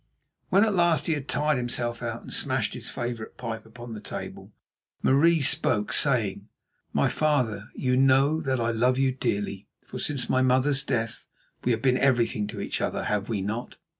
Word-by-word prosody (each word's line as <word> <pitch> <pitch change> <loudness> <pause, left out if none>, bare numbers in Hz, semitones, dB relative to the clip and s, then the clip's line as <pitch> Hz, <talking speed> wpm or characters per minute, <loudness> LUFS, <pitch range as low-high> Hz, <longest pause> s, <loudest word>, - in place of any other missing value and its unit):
When 195 +3 +5
at 220 -2 +2
last 170 -5 +3
he 165 - +1
had 145 -3 -4
tired 150 +2 +1
himself 120 -1 -2
out 115 -1 -4
and - - -7
smashed - - 0
his - - -6
favourite 120 -2 -5
pipe 115 -2 -6
upon 120 +1 -10
the 110 - -6
table, - - -7 0.5
Marie 160 +4 +4
spoke, 105 -5 +2
saying: 120 -9 +2 0.4
"My - - +2
father, 125 -9 0
you 125 -1 0
know 135 +4 +4
that 130 -4 -1
I 115 0 +1
love 125 +3 +2
you 135 -1 +2
dearly, 105 -6 -3 0.2
for - - -7
since 140 -5 -1
my 130 - +2
mother's 130 +2 +3
death 115 -3 -2 0.4
we 125 - +2
have 115 -1 -1
been 130 -1 +3
everything 120 -5 +2
to 105 - -7
each - - -3
other, - - -1
have 105 0 -1
we 105 -4 -1
not?" 110 +5 -4
125 Hz, 185 wpm, -26 LUFS, 115-140 Hz, 0.5 s, When